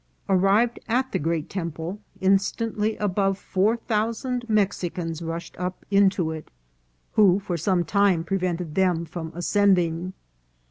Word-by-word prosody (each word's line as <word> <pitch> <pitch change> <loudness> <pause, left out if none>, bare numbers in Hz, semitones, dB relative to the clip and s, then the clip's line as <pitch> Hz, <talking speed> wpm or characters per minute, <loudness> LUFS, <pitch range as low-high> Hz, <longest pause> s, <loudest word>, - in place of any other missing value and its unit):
Arrived 195 +5 +3
at 255 +3 0
the - - 0
great 160 0 -1
temple, 170 +1 -5 0.2
instantly 210 +3 +1
above 195 -1 0
four 200 +4 +1
thousand 230 +2 -2
Mexicans 175 -5 -1
rushed 165 0 -5
up 180 0 -4
into 195 -4 +3
it, 160 -1 -7 0.6
who 195 -4 +5
for 190 -3 -3
some 175 +2 +1
time 200 -3 +2
prevented 180 -3 -2
them 180 -2 +1
from 160 0 -6
ascending. 180 -2 +2
190 Hz, 125 wpm, -25 LUFS, 170-205 Hz, 0.6 s, who